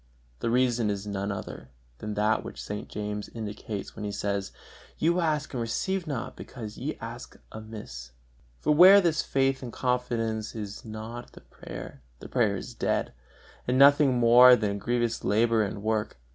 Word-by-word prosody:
The - - -1
reason 120 -2 +2
is 100 0 -3
none 100 0 -3
other 95 -8 -7 0.3
than 105 -1 -5
that 105 +1 +1
which - - -9
St. 105 0 -6
James 105 0 -5
indicates 105 -2 -6
when 105 - -7
he 105 - -3
says: 100 -1 -2 0.5
"You 170 +3 +2
ask 155 -4 0
much - - -17
and 125 - -2
receive 175 +11 -2
not, 130 -4 -4
because 110 -4 -8
ye 145 +4 -4
ask 115 +2 -8
amiss." 105 - -9 0.5
For 150 - +1
where 185 +6 +9
this 170 -4 +1
faith 135 0 0
and 125 -3 -6
confidence 115 -4 -2
is 105 -2 -6
not 110 +2 -7
in - - -22
the - - -13
prayer, 65 - -10 0.2
the - - -10
prayer - - +2
is - - -7
dead, - - -1 0.5
and 125 +1 +1
nothing 140 -1 +6
more 120 +1 +8
than 105 -3 -1
a - - -3
grievous 120 +1 -1
labor 115 +2 +2
and 100 0 -3
work. 110 -5 -1
115 Hz, 175 wpm, -27 LUFS, 105-125 Hz, 0.5 s, where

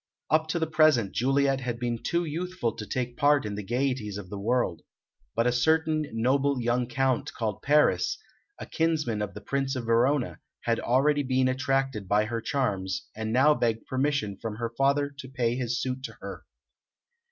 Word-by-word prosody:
Up 155 +1 +3
to 160 - -1
the 160 - +1
present 155 -10 +3
Juliet 135 +2 +2
had 120 -2 -3
been 120 -2 -2
too 170 0 0
youthful 170 -4 -2
to 105 - -7
take 125 -1 -3
part 145 -3 +3
in 105 - -3
the 105 - -4
gaieties 120 -2 -1
of 95 -3 -9
the 100 - -5
world, 110 -6 0 0.5
but 115 - +2
a 125 - +3
certain 155 +4 +2
noble 135 +4 +1
young 120 +1 0
Count 130 0 0
called 110 -2 -3
Paris, 150 +1 +3 0.4
a - - -7
kinsman 155 -10 0
of 100 -1 -4
the 105 - -7
Prince 135 +4 -1
of 125 -2 -4
Verona, 120 +4 +2 0.2
had 115 -1 0
already 145 +4 +2
been 130 -1 +1
attracted 135 -4 0
by 105 +2 +3
her 115 +1 -3
charms, 100 -9 -2
and 110 0 -3
now 135 +6 +5
begged 115 -5 -1
permission 130 -7 -1
from 110 -2 -4
her 115 +1 -3
father 140 +2 +2
to 130 - -7
pay 120 -3 0
his 120 -1 -1
suit 130 +1 -3
to - - -7
her. - - -9
125 Hz, 185 wpm, -27 LUFS, 115-140 Hz, 0.5 s, now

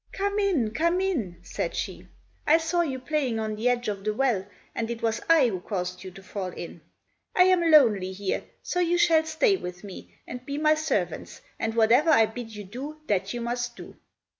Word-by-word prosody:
"Come 400 +1 -1
in, 335 - +1
come 335 +9 +1
in," 270 - -1
said - - -4
she. - - -5 0.4
"I 315 - +7
saw 330 +1 0
you 280 -6 -2
playing 260 -3 -1
on 215 -1 -2
the 225 +4 +1
edge 245 0 0
of 200 -2 -3
the 215 0 -1
well, 225 -7 +1 0.3
and 225 0 -3
it 235 -1 -5
was 225 -1 0
I 310 -7 +6
who 190 -4 -3
caused 180 -2 -4
you 190 - -7
to 190 +1 -14
fall 190 0 -5
in. 170 -2 -8 0.5
I 365 - +7
am 365 -2 +3
lonely 220 -12 +5
here, 190 0 -3 0.2
so 360 - -2
you 350 0 +2
shall 330 -2 +4
stay 380 +6 +2
with 180 - -8
me 195 -2 -10
and 245 +1 -8
be 280 +2 -5
my 305 0 +4
servants, 310 0 -2 0.2
and 225 0 -2
whatever 235 +8 +4
I 225 -8 +6
bid 225 0 -8
you 210 - -7
do 265 +10 -7
that 195 -4 0
you 240 - -4
must 240 0 -3
do." - - -11
245 Hz, 210 wpm, -26 LUFS, 210-315 Hz, 0.5 s, I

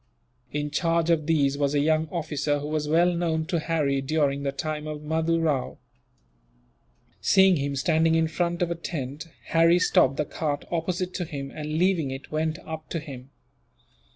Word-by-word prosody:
In 150 0 -3
charge 165 +1 +1
of 155 -2 +1
these 140 -3 +2
was 145 0 +1
a - - +3
young 155 +2 +2
officer, 150 -3 -1
who 145 - -5
was 155 -1 -1
well 170 +3 +3
known 165 -2 0
to 170 0 -1
Harry 150 -4 0
during 140 0 0
the 140 -1 -1
time 155 +2 -4
of 150 -1 -6
Mahdoo 160 +2 0
Rao. 150 -6 -1 1.4
Seeing 190 - +5
him 140 0 -2
standing 160 +4 +2
in 165 0 +3
front 170 +2 -1
of 170 - -2
a - - 0
tent, 150 -2 -5 0.2
Harry 165 +1 +5
stopped 175 -7 +3
the 150 - 0
cart 145 -1 -3
opposite 180 +2 -2
to 180 - -2
him 140 -3 -6
and, 150 0 -5
leaving 175 -5 +2
it, 135 +1 -7
went 155 +1 -1
up 160 -1 -7
to 165 - -2
him. 135 -4 -10
155 Hz, 180 wpm, -26 LUFS, 145-165 Hz, 1.4 s, Seeing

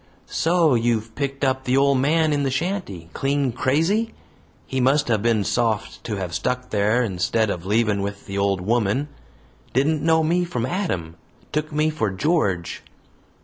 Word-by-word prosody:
"So 165 -3 +2
you've 115 -2 0
picked 140 +2 -3
up 130 -1 +1
the 125 +1 +2
ole 140 0 +4
man 155 +4 +2
in 145 - +1
the 140 - +1
shanty, 130 - -3
clean 140 -1 0
crazy? 165 - 0 0.5
He 130 -1 -2
must 135 +2 +2
have 110 -3 +2
been 115 -2 +2
soft 110 +1 -1
to 110 - -2
have 90 -3 -4
stuck 125 +6 -2
there 105 +4 +2
instead 105 +2 0
o' - - -2
leavin' 105 +3 +1
with 100 0 -5
the 100 - -6
old 100 -2 +1
woman. 115 +7 0 0.6
Didn't 145 +4 +2
know 160 +1 +3
me 175 +3 +2
from 160 -10 -2
Adam; 95 - -3 0.3
took 155 +1 -2
me 155 +1 +1
for 115 -9 -1
George!" 95 - 0
125 Hz, 165 wpm, -23 LUFS, 105-150 Hz, 0.6 s, ole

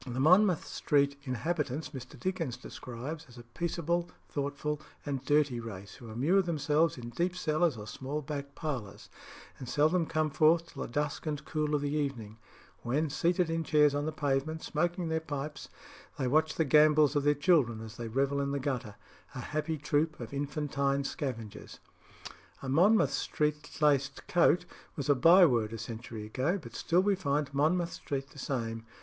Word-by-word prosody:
The 125 0 -5
Monmouth 180 +4 +5
Street 140 -1 +1
inhabitants 145 +3 -2
Mr. 130 -1 -9
Dickens 175 -9 -2
describes 140 +7 -7
as 125 - -15
a 120 - -10
peaceable, 170 +5 -2 0.2
thoughtful, 145 +1 -3 0.2
and 140 -3 -3
dirty 145 -3 +2
race, 100 -4 -8
who 120 - -11
immure 145 - +3
themselves 160 -2 +1
in 120 -1 -7
deep 175 +9 -1
cellars 155 -4 +1
or 105 - -7
small 135 +8 -5
back 140 -1 -6
parlours, 130 -11 -5 0.5
and 125 - -7
seldom 155 +3 +2
come 155 -2 0
forth 160 +2 +3
till - - -7
the - - -3
dusk 150 +4 -2
and 150 -1 -3
cool 150 -1 0
of 145 - 0
the 145 0 -2
evening, 120 -8 -3 0.4
when, 145 +5 0
seated 170 +2 +1
in 165 0 0
chairs 150 -2 +4
on 145 +1 -1
the - - -1
pavement, 150 +1 -1
smoking 175 +3 -1
their 160 0 0
pipes, 150 -2 -6 0.5
they 130 - 0
watch 155 +4 +2
the 160 - +1
gambols 150 0 +5
of 145 - +3
their 145 +1 +3
children 145 -8 +3
as 110 0 -9
they 120 - -5
revel 140 +4 0
in 140 - -1
the 140 0 -1
gutter, 130 -6 -3 0.4
a - - -4
happy 155 +1 -2
troop 150 +2 0
of 120 0 -7
infantine 140 -1 -1
scavengers. 120 -7 -5 0.9
"A - - -4
Monmouth 195 +11 +4
Street 150 0 -2
laced 140 -3 +2
coat" 175 0 +4 0.3
was 140 -1 -4
a - - +7
byword 135 - +5
a - - -4
century 115 -1 -7
ago, 135 - 0
but 115 -8 -11
still 175 +7 +2
we 205 0 +3
find 145 -6 -1
Monmouth 165 +5 +1
Street 135 -1 -4
the 145 - -12
same. 115 -4 -3
145 Hz, 175 wpm, -31 LUFS, 130-160 Hz, 0.9 s, a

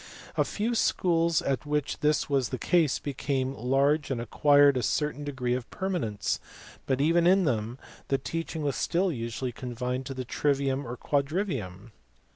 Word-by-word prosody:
A - - +3
few 225 +3 -2
schools 170 -7 +2
at 135 -2 -1
which 150 -1 -2
this 150 0 +2
was 135 -4 +1
the 130 - -3
case 160 +3 +2
became 135 -1 -2
large 140 +5 +1
and 130 -3 -1
acquired 145 +4 +4
a 125 - 0
certain 145 +5 -1
degree 130 -4 -2
of 125 -1 -3
permanence, 170 - -2 0.5
but 130 -1 +1
even 165 +4 +3
in 190 +1 +5
them 115 -2 -1 0.3
the 135 - +2
teaching 165 +3 -4
was 140 -1 0
still 180 +2 +1
usually 120 -1 -3
confined 125 +2 -4
to 135 - -5
the 130 0 -4
trivium 140 0 0
and 120 +1 -6
quadrivium. 140 - -2
140 Hz, 160 wpm, -28 LUFS, 125-155 Hz, 0.5 s, in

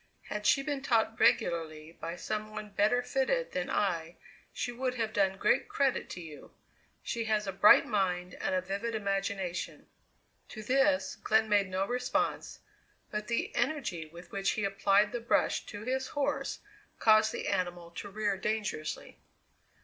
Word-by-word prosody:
"Had 210 0 -2
she 275 - +4
been 285 -1 -2
taught 225 -4 +1
regularly 165 -9 +1
by 170 0 -6
some 215 +3 -4
one 215 -1 -7
better 215 +5 +2
fitted 280 - 0
than 180 - -2
I 170 -4 -1 0.3
she 240 - -3
would 250 +1 -2
have 225 -2 -2
done 195 -1 +2
great 255 - +2
credit 275 -2 0
to 175 - -6
you. 155 -3 -11 0.5
She 230 -2 -2
has 215 -1 +1
a 195 - -2
bright 195 +2 +7
mind 180 -4 -1
and - - 0
a 185 - +1
vivid 200 +5 -3
imagination." 195 -3 -2 0.6
To 215 - -8
this 270 +4 +2
Glenn 220 0 +2
made 205 -2 +3
no 190 +1 0
response, 245 +3 -1 0.5
but 210 0 -3
the 235 - -1
energy 235 - -1
with 170 +3 -13
which 195 0 0
he 220 - -2
applied 200 +1 +3
the 240 - -3
brush 235 - +1
to 205 0 -7
his 260 +2 -1
horse 285 0 -2 0.4
caused 215 0 +5
the - - -4
animal 175 -1 -2
to 200 +4 -7
rear 205 -1 -1
dangerously. 200 -6 -3
210 Hz, 160 wpm, -31 LUFS, 185-235 Hz, 0.6 s, bright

